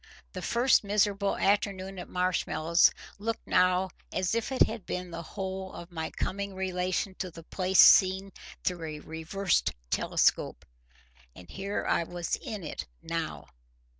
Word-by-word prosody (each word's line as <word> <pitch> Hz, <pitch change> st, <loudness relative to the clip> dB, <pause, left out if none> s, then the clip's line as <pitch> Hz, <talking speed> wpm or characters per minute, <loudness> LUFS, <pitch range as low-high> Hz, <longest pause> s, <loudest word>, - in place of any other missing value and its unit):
The -, -, -5 dB
first 240 Hz, +1 st, +3 dB
miserable 200 Hz, -1 st, +1 dB
afternoon 195 Hz, -1 st, 0 dB
at -, -, -8 dB
Marshmallows 180 Hz, -2 st, +2 dB, 0.3 s
looked 225 Hz, +2 st, -3 dB
now 185 Hz, +1 st, +3 dB, 0.2 s
as 185 Hz, +1 st, 0 dB
if 230 Hz, +3 st, -1 dB
it 260 Hz, -, +5 dB
had 220 Hz, -3 st, -3 dB
been 180 Hz, 0 st, -5 dB
the 165 Hz, 0 st, -5 dB
whole 190 Hz, +2 st, -5 dB
of 175 Hz, +1 st, -9 dB
my 160 Hz, -2 st, -3 dB
coming 200 Hz, 0 st, -3 dB
relation 185 Hz, +1 st, -1 dB
to 185 Hz, -, -3 dB
the 165 Hz, -1 st, -12 dB
place 185 Hz, +2 st, -1 dB
seen 190 Hz, +1 st, +7 dB, 0.3 s
through 180 Hz, -2 st, -1 dB
a -, -, -8 dB
reversed 160 Hz, +5 st, -1 dB, 0.2 s
telescope. -, -, +1 dB, 0.7 s
And 90 Hz, -, -13 dB
here 200 Hz, +1 st, -3 dB
I -, -, +2 dB
was 175 Hz, 0 st, -3 dB
IN 210 Hz, -4 st, -6 dB
it 155 Hz, -, -5 dB, 0.2 s
now. 165 Hz, -, -4 dB
185 Hz, 145 wpm, -29 LUFS, 175-200 Hz, 0.7 s, seen